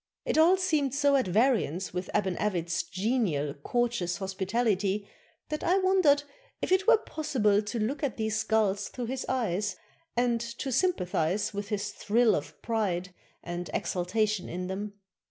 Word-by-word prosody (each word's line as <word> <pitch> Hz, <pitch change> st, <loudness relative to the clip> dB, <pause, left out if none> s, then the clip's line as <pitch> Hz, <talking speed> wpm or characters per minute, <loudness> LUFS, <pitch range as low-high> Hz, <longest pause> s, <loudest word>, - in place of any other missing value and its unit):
It -, -, 0 dB
all 330 Hz, +4 st, +6 dB
seemed 305 Hz, -8 st, +1 dB
so 285 Hz, -1 st, +3 dB
at 260 Hz, -7 st, +2 dB
variance 200 Hz, -, +2 dB
\vith 180 Hz, +1 st, -4 dB
Aban 190 Hz, -3 st, +1 dB
Avit's 170 Hz, -4 st, 0 dB
genial, 185 Hz, -, -1 dB
cour 240 Hz, 0 st, +2 dB
teous 180 Hz, -7 st, -3 dB
hospitality, 200 Hz, +1 st, 0 dB, 0.4 s
that 305 Hz, -, -3 dB
I 365 Hz, +3 st, +3 dB
wondered 370 Hz, -7 st, +4 dB, 0.4 s
if -, -, -3 dB
it 375 Hz, +2 st, +3 dB
were 470 Hz, -1 st, +8 dB
possible 260 Hz, -, +1 dB
to 215 Hz, +3 st, -4 dB
look 255 Hz, +7 st, -1 dB
at 280 Hz, -6 st, -2 dB
these 220 Hz, -1 st, -1 dB
skulls 215 Hz, -2 st, +1 dB
through 245 Hz, -, -5 dB
his 260 Hz, +2 st, -4 dB
eyes, 205 Hz, -6 st, 0 dB, 0.4 s
and 240 Hz, -1 st, +2 dB
to 235 Hz, +3 st, -4 dB
sympathize 205 Hz, -, +1 dB
with 205 Hz, 0 st, -4 dB
his 205 Hz, 0 st, -2 dB
thrill 225 Hz, +3 st, +2 dB
of -, -, -4 dB
pride 185 Hz, -6 st, -1 dB, 0.3 s
and 175 Hz, 0 st, -5 dB
exultation 200 Hz, +3 st, 0 dB
in 180 Hz, +1 st, -4 dB
them. 200 Hz, +3 st, -4 dB
215 Hz, 155 wpm, -29 LUFS, 190-260 Hz, 0.4 s, were